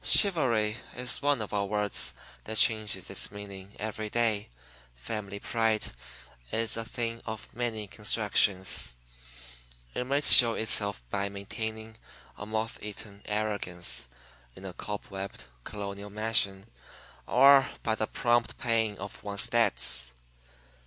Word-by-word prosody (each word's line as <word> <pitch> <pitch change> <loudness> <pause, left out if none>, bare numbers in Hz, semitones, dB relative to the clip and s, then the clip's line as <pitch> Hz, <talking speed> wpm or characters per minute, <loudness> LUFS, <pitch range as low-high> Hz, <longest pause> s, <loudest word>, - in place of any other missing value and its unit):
Chivalry 120 - +4 0.2
is 125 -1 0
one 140 -5 +2
of 105 - -9
our 100 -1 0
words 105 0 0 0.3
that 110 - -3
changes 110 -1 +2
its - - +1
meaning 100 -1 -10
every 110 0 -4
day. 110 -3 0 0.5
Family 100 - -5
pride 115 -1 0 0.6
is 115 0 0
a 115 - -2
thing 115 0 -4
of 110 -1 -5
many 115 -3 -3
constructions 100 - 0 1.0
it - - -2
may 140 +3 +1
show 120 -5 +10
itself 100 - -1
by 100 0 -1
maintaining 110 +2 -6 0.4
a 105 - -8
moth 110 +1 -3
eaten 105 -1 -8
arrogance 105 -8 -2 0.5
in 95 - -11
a 95 - -6
cobwebbed 100 0 -6 0.2
Colonial 100 0 -6
mansion 100 -2 0 0.6
or 135 +1 +6
by 110 - +1
the 110 0 -1
prompt 120 -1 +1
paying 110 -3 0
of 100 +1 -8
one's 105 +3 +1
debts. 65 - +2
110 Hz, 125 wpm, -29 LUFS, 100-115 Hz, 1.0 s, show